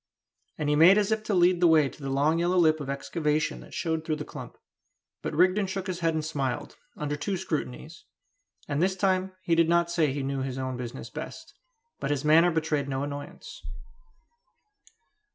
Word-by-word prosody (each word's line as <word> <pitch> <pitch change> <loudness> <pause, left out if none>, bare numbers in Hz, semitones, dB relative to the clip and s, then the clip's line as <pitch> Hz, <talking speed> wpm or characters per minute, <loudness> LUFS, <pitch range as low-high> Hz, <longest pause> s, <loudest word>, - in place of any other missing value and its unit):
And 150 - -2
he 150 - +3
made 170 +6 +7
as 210 0 +1
if 220 0 +1
to 215 - -1
lead 175 0 +4
the 175 - +6
way 155 -3 +5
to 140 - -12
the 135 - -4
long 145 +4 +2
yellow 175 +2 +1
lip 155 -3 +4
of 140 -2 -6
excavation 155 +2 -1
that - - -12
showed 160 -1 -1
through 155 -1 -1
the 150 -1 -6
clump. - - -9 0.6
But - - -4
Rigden 185 +4 +3
shook 190 0 -4
his 185 -2 -4
head 165 -2 +1
and 155 -1 -2
smiled, 135 -6 -3 0.2
under 145 -1 -2
two 190 +6 -2
scrutinies; 160 -2 -5 0.6
and 145 +1 -1
this 190 +1 +2
time 190 0 0
he 170 - +1
did 165 0 +4
not 170 0 +2
say 165 -3 +2
that 135 - -2
he 140 -1 -3
knew 135 0 -2
his 130 -1 -4
own 130 -1 -3
business 120 -1 -7
best; - - -8 0.5
but - - -3
his 145 -1 -1
manner 165 +3 +6
betrayed 155 -4 -1
no 135 0 -2
annoyance. 145 0 -7
160 Hz, 200 wpm, -27 LUFS, 145-175 Hz, 0.6 s, made